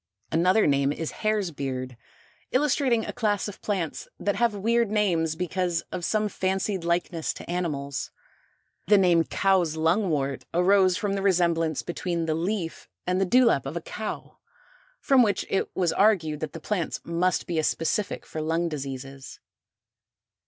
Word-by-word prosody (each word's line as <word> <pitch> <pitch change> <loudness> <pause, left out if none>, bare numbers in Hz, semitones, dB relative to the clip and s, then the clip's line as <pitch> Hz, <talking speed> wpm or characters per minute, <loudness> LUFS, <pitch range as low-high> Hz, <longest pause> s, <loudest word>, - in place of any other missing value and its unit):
Another 185 +6 +3
name 140 -1 +2
is 160 +1 -4
Hare's 215 -4 -1
Beard, 130 -3 -4 0.6
illustrating 255 -4 +2
a - - -5
class 210 -4 0
of 205 - -9
plants 185 -7 -3
that 205 - 0
have 235 -3 +1
weird 230 +2 +1
names 175 -7 +1
because 180 0 -1
of 180 - -4
some 215 +3 +1
fancied 190 -1 -1
likeness 170 -1 -1
to - - -10
animals. 150 -6 -3 0.8
The 205 +1 +6
name 175 -3 +4
Cow's 185 -5 +2
Lungwort, 160 - +1
arose 185 +1 +4
from 205 -1 -1
the 195 - -1
resemblance 170 -5 +1
between 170 -1 -2
the 160 - 0
leaf 170 +1 -3 0.2
and 180 +1 +1
the 190 - +2
dewlap 230 - +4
of 150 +5 -4
a - - -1
cow, 215 +5 -6 0.6
from 270 - +4
which 205 -5 +1
it 195 - 0
was 180 -3 +1
argued 175 -8 +2
that 155 -2 -5
the 165 - -6
plant 175 -1 -2
must 175 +2 0
be 170 -2 -1
a - - 0
specific 165 +7 -1
for 155 - -5
lung 165 +2 0
diseases. 135 -2 -7
180 Hz, 155 wpm, -26 LUFS, 160-205 Hz, 0.8 s, The